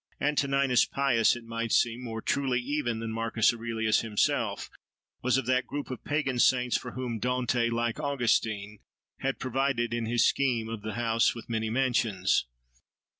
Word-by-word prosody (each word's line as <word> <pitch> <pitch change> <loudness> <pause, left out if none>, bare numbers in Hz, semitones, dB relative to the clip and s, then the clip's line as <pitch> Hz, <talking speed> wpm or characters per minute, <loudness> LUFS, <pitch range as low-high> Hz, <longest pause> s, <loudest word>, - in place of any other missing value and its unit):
Antoninus 140 -3 +2
Pius, 130 -5 +2
it 120 - -9
might 115 0 -4
seem, 120 +1 +2
more 115 -2 -5
truly 130 -3 0
even 125 -3 -2
than 115 0 -4
Marcus 115 0 +1
Aurelius 115 -2 0
himself, 110 -3 0 0.5
was 125 0 +2
of 135 - -1
that 130 +1 +1
group 145 -2 -5
of 130 - -7
pagan 145 -4 -1
saints 125 0 +3
for 125 - -3
whom 125 -3 -4
Dante, 125 0 0
like 115 +2 -1
Augustine, 110 -7 0 0.4
has 135 0 -1
provided 130 -2 -1
in 120 -1 -2
his 120 +1 +3
scheme 120 -5 0
of 115 -2 -5
the 110 +1 -5
house 115 -1 +1
with 115 - -9
many 110 -1 -1
mansions. 115 - +1
120 Hz, 160 wpm, -28 LUFS, 115-130 Hz, 0.5 s, saints